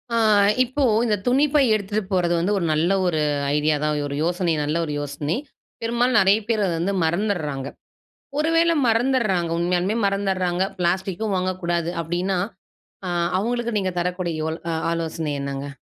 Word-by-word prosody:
அ - - +2 0.5
இப்போ 260 +3 -2 0.2
இந்த 215 -2 +2
துணிப்பை 280 +3 +3
எடுத்துட்டு 210 0 -1
போறது 175 -2 +2
வந்து, 195 +5 +1
ஒரு 175 - -1
நல்ல 165 +4 +1 0.2
ஒரு 160 -3 0 0.4
ஐடியா 150 +1 +2
தான். 150 -1 0
ஒரு 140 - -4
யோசனை 175 0 0
நல்ல 150 +3 -1
ஒரு 150 - -4
யோசனை. 145 +3 -3 0.5
பெரும்பாலும் 235 +2 +1
நெறைய 195 +2 +4
பேர் 220 -3 +1
அத 180 - 0
வந்து 195 +4 0
மறந்தர்றாங்க. 160 -7 -1 0.7
ஒரு 320 +2 +1
வேளை 335 0 +4
மறந்துருறாங்க 225 -7 +1
உண்மையாலுமே, 180 +4 0
மறந்துருறாங்க. 190 -2 0 0.2
பிளாஸ்டிக்கும் 190 +4 -1
வாங்கக்கூடாது 175 -2 -1
அப்டீன்னா, 175 +3 -1 0.7
அ - - -2 0.3
அவங்களுக்கு 235 0 -1
நீங்க 185 -2 -2
தரக்கூடிய 180 -1 -2
யோ 160 - -1 0.4
ஆலோசனை 160 -2 -3
என்னங்க? 140 0 -4
185 Hz, 145 wpm, -23 LUFS, 170-215 Hz, 0.7 s, நெறைய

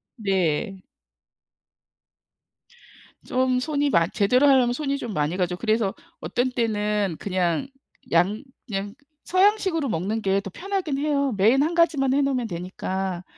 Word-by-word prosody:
네. 190 - -1 2.4
좀 255 0 +1
손이 290 +1 0
많 170 -7 +3
제대로 250 +7 +3
하려면 255 -3 +4
손이 280 +1 -2
좀 235 -6 -5
많이 150 +3 -1
가죠. 180 -1 0
그래서 215 -1 0 0.3
어떤 245 +11 -1
때는 210 -6 -1
그냥 185 +4 -1 0.4
양 185 +7 +2 0.2
그냥 200 -1 -4 0.3
서양식으로 375 -5 +2
먹는 210 +5 -2
게 195 -1 +1
더 195 - -7
편하긴 375 -7 -3
해요. 280 -2 0
메인 230 +8 +4
1 325 - -1
가지만 305 -6 +3
해 285 - +3
놓으면 260 -4 0
되니까. 185 0 -4
225 Hz, 250 characters per minute, -24 LUFS, 190-275 Hz, 2.4 s, 하려면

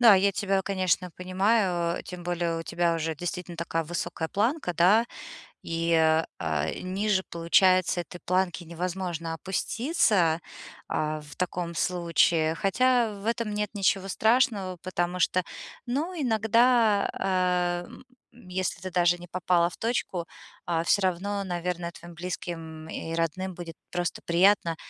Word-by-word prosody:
Да, 230 -4 +9
я 195 +1 +3
тебя, 195 -1 0
конечно, 185 -2 0
понимаю, 185 -2 +1
а, - - -6
тем 180 -1 -8
более 175 -1 -1
у 165 - -4
тебя 170 0 0
уже 160 0 -2
действительно 175 +1 -5
такая 165 0 -2
высокая 160 0 -3
планка, 225 - 0
да, 200 +8 +5 0.6
и, 165 0 -1
а, 160 0 +3
а, 80 -2 -1
ниже, 190 +1 -1
получается, 180 +1 +3
этой 175 +1 -11
планки 185 -1 0
невозможно 170 -1 -4
опуститься, 190 - +1 0.5
а, 155 0 -1
в 150 0 -13
таком 175 -1 -3
случае. 170 -2 +2
Хотя, 235 +4 +2
в - - -10
этом 230 -2 -1
нет 210 -1 -1
ничего 195 -1 +1
страшного, 215 -3 +2
потому 180 0 -2
что, 180 +1 +2 0.4
ну, 295 +9 -1
иногда, 230 -3 +3
а, 180 -2 0
м, 260 - -14 0.4
если 185 +1 -2
ты 185 - -4
даже 175 0 +3
не 175 - -10
попала 175 -1 +2
в 170 - -13
точку, 220 -7 -2 0.4
а, 165 -1 0
всё 195 +3 +2
равно, 195 +3 -1
наверное, 175 -1 -3
твоим 170 0 -12
близким 160 -2 -6
и 165 - -5
родным 175 +3 -1
будет 170 -2 -8 0.2
просто 175 -1 -2
приятно, 170 -1 +3
180 Hz, 140 wpm, -27 LUFS, 170-195 Hz, 0.6 s, Да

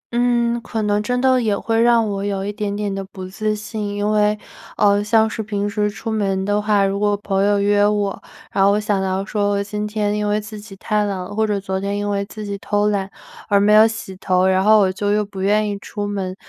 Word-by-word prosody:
嗯， 240 -1 +1
可 220 -1 -3
能 205 0 +1
真 245 +4 -1
的 260 -1 +3
也 210 -3 0
会 225 +2 0
让 235 -2 +4
我 200 -1 -3
有 195 -1 -2
一 205 - -3
点 205 -1 -3
点 205 -1 -2
的 195 0 -4
不 190 -1 -9
自 215 +3 -2
信， 210 0 -5
因 205 0 -1
为， 210 0 +2 0.4
呃， 205 0 +3
像 220 +1 +3
是 220 - -4
平 205 -1 -2
时 210 0 0
出 225 +2 -6
门 195 -3 -1
的 205 +1 +1
话， 205 -1 +2
如 195 +1 -1
果 205 0 +1
朋 195 -1 -1
友 205 0 +3
约 205 0 +3
我， 205 -1 0 0.3
然 195 - +2
后 195 - +5
我 205 - +2
想 210 -2 0
到 190 0 -1
说 205 -1 -1
我 200 0 0
今 210 +1 -4
天 210 -1 -1
因 210 0 -1
为 210 +1 +1
自 215 0 -9
己 205 -1 -12
太 210 +2 -1
懒 200 -2 -2
了 185 +2 -6
或 220 0 +1
者 205 -1 0
昨 190 -1 -3
天 200 +1 -2
因 205 0 -2
为 200 0 -1
自 215 +1 -8
己 200 0 -4
偷 205 0 0
懒 195 -2 -1 0.4
而 200 -1 +4
没 210 +1 +4
有 215 +1 +7
洗 220 -4 -6
头， 185 -1 +1
然 190 0 +3
后 215 +1 +6
我 190 - +2
就 205 +2 -2
又 210 0 +1
不 200 -1 -8
愿 210 +2 +2
意 205 -1 -3
出 205 0 -5
门。 195 -2 -3
205 Hz, 275 characters per minute, -20 LUFS, 200-215 Hz, 0.4 s, 有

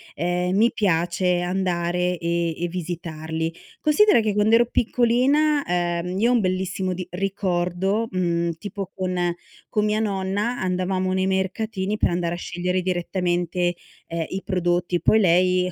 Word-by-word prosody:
ehm, 180 +2 0
mi 230 +3 +5
piace 180 -2 +1
andare 180 -1 0
e 170 +1 -1 0.2
e 175 - -1
visitarli. 165 -2 -4 0.3
Considera 410 - +5
che 215 -2 0
quand'ero 220 +3 +4
piccolina 260 +6 +2
ehm, 175 +1 -1
io 230 +3 +3
ho - - +3
un 240 - +3
bellissimo 185 0 -1
di 180 0 -5
ricordo, 190 +2 -1
mhmm, 170 -2 0
tipo 200 -1 -6
con 180 -2 -1 0.4
con 210 -1 +1
mia 210 0 +1
nonna 205 +3 -1
andavamo 185 0 -1
nei 190 0 +1
mercatini 190 +2 -1
per - - +2
andare 170 0 -1
a - - -7
scegliere 180 +1 -2
direttamente, 175 -1 -1 0.3
ehm, 165 -1 -3
i 190 - -4
prodotti. 175 -1 0
Poi 220 - +4
lei 180 0 +3
185 Hz, 140 wpm, -23 LUFS, 175-200 Hz, 0.4 s, mi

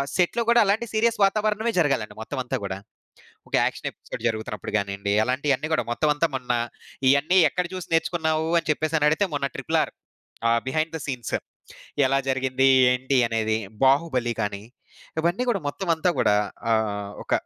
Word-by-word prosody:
సెట్‌లో 185 +6 +2
గూడా 235 0 +6
అలాంటి 210 +4 +1
సీరియస్ 230 +1 +2
వాతావరణమే 215 +3 0
జరగాలండి 135 -9 0
మొత్తం 130 +5 -5
అంతా 130 +1 -2
గూడా. 95 -1 -3 0.7
ఒక - - -17
యాక్షన్ - - -2
ఎపిసోడ్ - - -9
జరుగుతున్నప్పుడు 110 -1 -5
గానియండి, 100 0 -2
అలాంటియన్నీ 135 +3 0
గూడా - - 0
మొత్తం 150 +5 +1
అంతా 165 +3 +1
మొన్న 125 -2 -2 0.6
ఇయన్నీ 145 +7 +3
ఎక్కడ 180 - -1
జూసి 185 -1 -6
నేర్చుకున్నావు? 160 -1 0
అని 160 - -12
చెప్పేసి 155 +1 -1
అని 150 - +4
అడిగితే 190 +6 +1
మొన్న 140 -1 -1
'ట్రిపుల్ - - -1
ఆర్' - - -12 0.6
ఆహ్, 115 0 +3
బిహైండ్ 155 +4 -1
థ - - -13
సీన్స్ 125 -5 -4 0.7
ఎలా 135 +1 +2
జరిగింది? 130 0 +2 0.3
ఏంటి? 130 +1 0
అనేది 110 -1 0 0.3
'బాహుబలి' 130 -4 +2
గానీ, 100 -1 -3 0.6
ఇవన్నీ 175 +8 +1
గూడా 200 -5 0
మొత్తం 170 +6 -6
అంతా 170 +3 +1
గూడా 105 - +3 0.4
ఆహ్, 105 -2 -1
ఒక, - - -7
140 Hz, 160 wpm, -24 LUFS, 120-170 Hz, 0.7 s, గూడా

